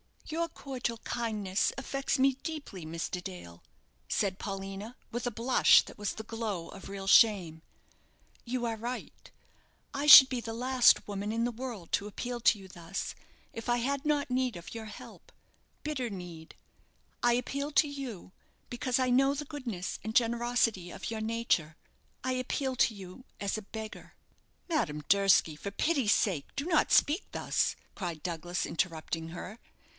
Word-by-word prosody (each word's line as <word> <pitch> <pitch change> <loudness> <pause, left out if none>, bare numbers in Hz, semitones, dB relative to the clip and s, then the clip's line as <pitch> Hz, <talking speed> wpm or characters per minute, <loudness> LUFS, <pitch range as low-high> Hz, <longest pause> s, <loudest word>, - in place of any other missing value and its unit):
"Your 335 +2 -1
cordial 255 -6 -4
kindness 210 -6 -1
affects 275 +1 -1
me 270 +1 +4
deeply, 285 - -6
Mr. 165 +3 -4
Dale," 85 - -9 0.5
said 195 -2 0
Paulina, 195 +3 -6 0.2
with 240 +1 -3
a - - -1
blush 235 +4 +5
that - - -12
was 205 -1 -2
the 220 - -7
glow 215 -6 -4
of - - -10
real 195 -1 -6
shame. 190 -6 +5 0.8
"You 245 0 -2
are 225 -1 -2
right; 240 +3 -6 0.6
I 285 +2 -2
should 265 -3 +12
be 255 - -2
the 225 -1 -5
last 250 +1 +4
woman 205 +1 -3
in 230 +1 0
the 240 - 0
world 235 -7 -7
to 205 - 0
appeal 245 +3 -4
to 225 - +4
you 190 -1 -12
thus 170 +2 -5 0.4
if 230 - -7
I 240 0 +3
had 275 +4 -1
not 290 -3 +1
need 255 -3 0
of 170 0 -9
your 225 -1 -6
help 215 - -12 0.5
bitter 270 -6 -2
need. 175 -5 -9 0.7
I 240 0 +4
appeal 280 +4 -2
to 290 +2 +5
you, 265 -11 -7 0.4
because 250 +1 0
I 255 -1 +2
know 270 +3 +4
the 295 +1 -4
goodness 245 - -5
and 220 +2 -5
generosity 235 -5 +2
of - - -6
your 220 -1 -3
nature. 220 -9 0 0.5
I 260 - 0
appeal 260 +1 -2
to 230 - +3
you 195 +6 -11 0.2
as 200 +1 -1
a - - -5
beggar." 220 +1 -8 0.5
"Madame 150 - 0
Durski, 195 -5 +4
for 200 - -5
pity's 270 -1 +2
sake, 175 -9 0
do 280 - -2
not 330 -3 +2
speak 310 +8 +4
thus," - - 0 0.2
cried 170 -6 -5
Douglas, 175 +1 -2
interrupting 165 -1 -2
her. 180 +6 -8
225 Hz, 160 wpm, -30 LUFS, 190-255 Hz, 0.8 s, should